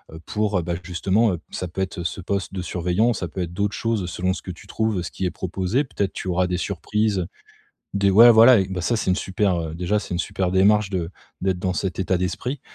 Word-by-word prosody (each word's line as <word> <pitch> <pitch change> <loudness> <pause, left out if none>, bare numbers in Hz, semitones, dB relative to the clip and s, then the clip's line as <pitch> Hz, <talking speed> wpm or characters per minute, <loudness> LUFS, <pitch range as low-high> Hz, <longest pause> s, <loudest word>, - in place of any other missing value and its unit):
heu, - - -8
pour, 105 -3 0
heu - - -3
bah 85 +1 -2
justement, 95 +5 +1
heu, 85 - -4
ça 90 - -4
peut 85 +3 -5
être 95 -1 -3
ce 85 +2 -3
poste 100 +1 -3
de 95 - -3
surveillant. 90 +7 +1
Ça 90 - -4
peut 90 - -5
être 85 -1 -3
d'autres 100 +2 -1
choses 115 -6 -1
selon 90 +1 -1
ce - - -7
que 95 - -6
tu 85 - -13
trouves, 110 -4 -1
ce - - -5
qui 95 - -3
est 90 - 0
proposé. 95 - -1
Peut-être 100 -6 -2
tu - - -6
auras 90 +1 +2
des 90 0 -1
surprises, 100 +1 -1 0.7
des 100 0 +2
ouais, 115 +5 +9
voilà, 115 -1 +7
bah, 95 -1 -3
ça 115 +6 +1
c'est 110 - -1
une 90 - +2
super, 95 -2 0
heu 80 -1 -5
déjà 90 +5 0
c'est 95 - -6
une - - -1
super 90 0 -2
démarche 100 +2 +4
de 90 -4 -2 0.3
d'être 95 -1 0
dans 95 -1 -1
cet 95 -1 -3
état 95 0 +1
d'esprit 125 +9 -3
95 Hz, 245 wpm, -23 LUFS, 90-105 Hz, 0.7 s, ouais